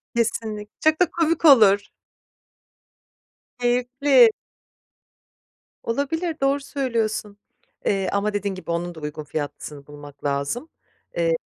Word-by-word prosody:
Kesinlik 220 -2 -2
çok 315 +1 +3
da 355 -2 +3
komik 330 0 0
olur. 210 -9 +6 1.7
Keyifli. 250 +1 +4 1.5
Olabilir. 320 +7 -2
Doğru 275 +1 +2
söylüyorsun. 230 -7 -2 0.5
Eee, 195 -1 +1
ama 200 +1 0
dediğin 200 -1 -2
gibi, 185 -2 -6
onun 170 +1 -3
da - - -9
uygun 150 0 -6
fiyatlısını 145 -1 -6
bulmak 145 -1 -13
lazım. 140 - -2 0.5
Eee, - - +2
220 Hz, 105 wpm, -23 LUFS, 175-280 Hz, 1.7 s, olur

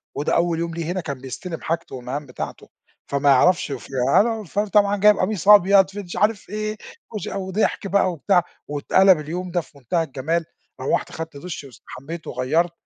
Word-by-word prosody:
وده 145 - 0
أول 170 -1 +1
يوم 170 0 -3
له 170 - -3
هنا 180 +3 -2
كان 140 -5 -6
بيستلم 165 +6 -6
حاجته 165 -3 -3
والمَهام 130 +4 -5
بتاعته، 125 - -7 0.4
فما 140 0 +1
يعرَفش" 145 +4 +4
وفي 135 - -7 0.3
أنا 230 +3 +3
وفر 210 0 -2
طبعًا 205 0 +3
جاي 210 +1 +6
بقميص 195 -1 -2
أبيض 200 -2 +7
في 205 +1 -6
دش 180 -3 -8
عارف 210 -2 +1
إيه، 215 +1 -3 0.4
وش 210 - -4
وضحك 195 +1 -1
بقى 195 -1 +2
وبتاع 175 +2 +2 0.2
واتقلَب 175 +5 +4
اليوم 175 +4 -5
ده 175 0 +1
في 150 - -20
منتهى 165 +6 -1
الجمال. 160 +3 -2 0.4
روَّحت - - 0
أخدت 160 -2 -7
دُش، 170 -1 -7
واستحمّيت، 140 +4 -10
وغيّرت، 155 +8 0
175 Hz, 175 wpm, -22 LUFS, 145-195 Hz, 0.4 s, أبيض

